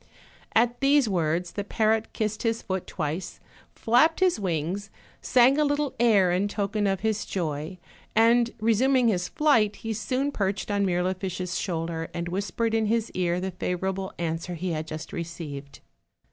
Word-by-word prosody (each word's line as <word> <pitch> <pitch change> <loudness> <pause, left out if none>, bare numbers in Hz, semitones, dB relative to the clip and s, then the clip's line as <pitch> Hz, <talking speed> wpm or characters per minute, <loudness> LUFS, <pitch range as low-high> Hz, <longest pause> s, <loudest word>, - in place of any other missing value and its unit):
At 240 +2 +3
these 280 -2 +4
words 170 -2 0
the 205 - -3
parrot 220 +1 +1
kissed 215 -1 -2
his 230 -1 -1
foot 190 -2 -3
twice, 160 +2 -4 0.4
flapped 245 +8 +3
his 370 -10 +3
wings, 180 +2 -2 0.3
sang 260 +3 +4
a - - +4
little 290 -1 0
air 205 -6 +4
in 185 +3 +1
token 205 0 -1
of 195 -2 0
his 215 -1 0
joy, 160 0 -3 0.4
and 230 +2 +5
re 225 +1 +3
suming 255 +1 +3
his 180 -4 0
flight, 225 -9 +3
he 225 0 -4
soon 260 +6 -1
perched 200 -4 -2
on 200 -1 +1
Mirlifiche's 185 0 -2
shoul 165 -4 -2
der, 165 -1 -4
and 170 0 -3
whispered 200 +5 -1
in 220 -1 +2
his 230 +1 0
ear 175 -1 0
the 190 +1 -3
favorable 190 +2 -3
answer 170 +1 -3
he 180 +2 -3
had 155 -1 -3
just 155 0 -7
received. 155 -4 -7
195 Hz, 165 wpm, -26 LUFS, 175-225 Hz, 0.4 s, and